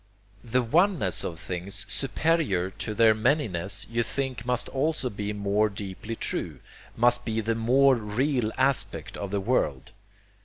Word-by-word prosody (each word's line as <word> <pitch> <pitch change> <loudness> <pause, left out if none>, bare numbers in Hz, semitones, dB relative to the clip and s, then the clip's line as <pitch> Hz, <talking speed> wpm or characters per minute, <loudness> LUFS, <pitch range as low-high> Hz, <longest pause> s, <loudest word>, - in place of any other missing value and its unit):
The 125 +1 +1
oneness 160 - +2
of 80 -2 -5
things, 95 +3 -5
superior 135 - 0
to 110 +2 -5
their 110 0 +6
manyness, 105 - 0
you 115 0 -1
think 130 +1 -3
must 125 -1 0
also 140 -2 -1
be 105 0 -4
more 105 +1 +1
deeply 100 +2 -6
true, - - -2 0.4
must 120 +1 +3
be 115 -1 -2
the 115 +1 0
more 130 +5 +4
real 120 +1 0
aspect 130 +1 +1
of 100 - -5
the 100 +1 -1
world. 95 - -1
115 Hz, 145 wpm, -27 LUFS, 100-130 Hz, 0.4 s, their